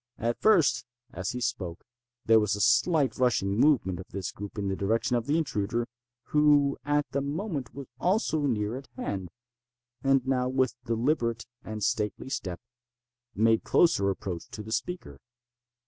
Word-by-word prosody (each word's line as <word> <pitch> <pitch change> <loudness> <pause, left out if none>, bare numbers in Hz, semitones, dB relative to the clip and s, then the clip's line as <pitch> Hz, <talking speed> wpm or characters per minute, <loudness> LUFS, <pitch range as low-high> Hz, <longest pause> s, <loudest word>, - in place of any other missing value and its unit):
At 120 +1 -2
first, 200 -9 +4 0.3
as 90 +2 -3
he 125 - -3
spoke, 90 -7 -3 0.4
there 115 0 +6
was 105 -1 +1
a - - -6
slight 130 - +3
rushing 115 -6 +2
movement 110 - +3
of 95 - -8
this 95 -3 -4
group 100 +1 -8
in 100 -1 -2
the 95 - -1
direction 110 +5 0
of 120 +1 -1
the 150 +3 +2
intruder, 115 -6 -1 0.4
who 145 -2 +4
at 145 0 +1
the 140 - 0
moment 145 - -4
was 140 -1 -6
also 175 -6 +1
near 105 -2 -1
at 135 - -10
hand, 95 -3 -3 0.7
and 135 -1 +3
now, 125 -1 +1
with 130 -1 +1
deliberate 115 -1 0 0.2
and 110 -1 -5
stately 105 +5 -1
step, 90 -9 -4 0.8
made 110 +2 +3
closer 100 - +3
approach 90 -3 -4
to 105 - -7
the 110 - -9
speaker. 110 - -4
120 Hz, 160 wpm, -28 LUFS, 105-140 Hz, 0.8 s, there